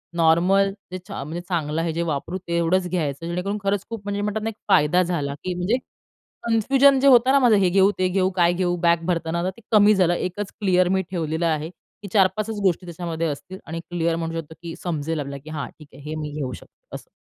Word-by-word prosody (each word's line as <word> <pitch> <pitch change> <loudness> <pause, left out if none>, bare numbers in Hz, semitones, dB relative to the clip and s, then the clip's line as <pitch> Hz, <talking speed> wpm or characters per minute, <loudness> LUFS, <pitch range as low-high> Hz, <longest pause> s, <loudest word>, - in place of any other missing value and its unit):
Normal 180 +4 +3 0.2
जे 185 - -4
चा 200 -8 -5
म्हणजे 165 +4 -5
चांगलं 160 -2 -1
आहे, 165 - -1
जे 170 - -2
वापरू 155 +5 -3
तेवढंच 170 +2 +1
घ्यायचं 160 -3 -2
जेणेकरून 180 +4 -2
खरंच 200 0 0
खूप 225 -3 -5
म्हणजे 205 0 -3
म्हणतात 210 +1 -2
ना 225 - -1
एक 225 - -8
फायदा 150 +5 +4
झाला 150 -5 -2
की 185 - -2
म्हणजे 180 +7 0 0.7
कनफ्यूजन 265 +4 +4
जे 275 - +3
होतं 255 0 +6
ना 280 - +5
माझं, 245 -4 +5
"हे 185 -2 +3
घेऊ, 195 +2 +4
ते 185 - +3
घेऊ, 185 0 +1
काय 175 -1 +3
घेऊ," 175 -1 0
बॅग 170 -1 +2
भरताना 170 -1 -1
आता 180 +2 0
ते - - -14
कमी 210 -1 +6
झालं 180 -2 +3
एकच 185 +3 -3
क्लिअर 185 -3 +3
मी 190 0 +2
ठेवलेलं 165 -1 -1
आहे, 155 0 0
की 200 +2 -15
4-5 195 +1 +3
च 210 - -5
गोष्टी 185 -2 +1
त्याच्यामध्ये 165 -1 -3
असतील 185 +6 -6
आणि 165 +1 -5
क्लिअर 170 -1 0
म्हणू 165 0 -3
शकतो 160 0 -9
की 170 -1 -7
समजेल 160 -2 -2
आपल्याला 140 -1 -6
की 155 - -11
"हां, 150 -5 -4
ठीक 150 - -13
आहे - - -13
हे 155 - -3
मी 150 -1 -5
घेऊ 130 -4 -3
शकते." - - -15
असं. - - -10
175 Hz, 225 wpm, -23 LUFS, 165-195 Hz, 0.7 s, होतं